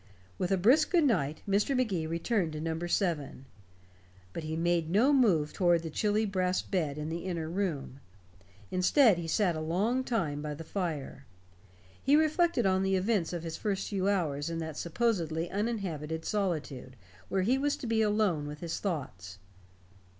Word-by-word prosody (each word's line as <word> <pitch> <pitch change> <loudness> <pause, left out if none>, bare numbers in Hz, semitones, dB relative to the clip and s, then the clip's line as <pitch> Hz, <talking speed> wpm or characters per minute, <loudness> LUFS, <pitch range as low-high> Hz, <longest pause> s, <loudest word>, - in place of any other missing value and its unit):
With 180 - -1
a 195 - +3
brisk 255 - +4
good 340 -2 +3
night, 155 - 0
Mr. 205 +7 +1
Magee 195 -11 0
returned 170 +1 -1
to 155 - -5
number 165 +2 -3
seven. 165 -7 -1 0.9
But 165 - -5
he 155 0 -3
made 170 -1 +1
no 230 - +4
move 185 - +3
toward 175 -3 +2
the 160 - -5
chilly 210 +4 +1
brass 185 -2 0
bed 155 -7 -2
in 150 +1 -4
the 170 +2 -4
inner 170 -4 -3
room. 165 -7 -3 0.7
Instead 185 - +4
he 165 - -5
sat 175 +1 +1
a - - -3
long 205 +11 0
time 165 - -1
by 150 0 -4
the 165 - -8
fire. 160 -6 -4 0.7
He 280 +2 +4
reflected 315 - +2
on 190 0 +3
the 195 0 +1
events 190 -2 0
of 175 -2 -4
his 165 -1 -5
first 200 -3 -2
few 195 -1 0
hours 155 -6 0
in 165 - -3
that 160 -2 -5
supposedly 170 -3 -1
uninhabited 180 -7 -3
solitude 155 - -2 0.3
where 190 -1 +1
he 255 +7 +2
was 290 +1 0
to - - -7
be 225 -1 +1
alone 205 -8 +1
with 150 +1 -8
his 170 -2 -3
thoughts. 130 - -4
175 Hz, 170 wpm, -30 LUFS, 160-210 Hz, 0.9 s, brisk